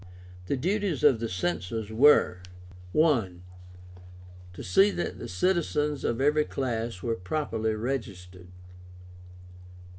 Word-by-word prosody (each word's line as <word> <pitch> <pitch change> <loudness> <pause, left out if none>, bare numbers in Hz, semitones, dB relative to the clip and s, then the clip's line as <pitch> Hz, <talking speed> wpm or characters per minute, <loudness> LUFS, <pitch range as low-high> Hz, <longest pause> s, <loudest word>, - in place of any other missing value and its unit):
The 140 - -1
duties 185 - -1
of 115 - +5
the 115 0 -3
Censors 90 +4 -3
were: 110 -7 +4 0.6
I. 130 - +3 1.2
To - - -9
see 195 +1 +4
that 175 - -4
the - - -6
citizens 150 -5 0
of 115 - -1
every 150 +2 +2
class 115 -6 -3
were 115 - 0
properly 110 +1 -2
registered. 100 -7 -5
120 Hz, 110 wpm, -27 LUFS, 100-150 Hz, 1.2 s, of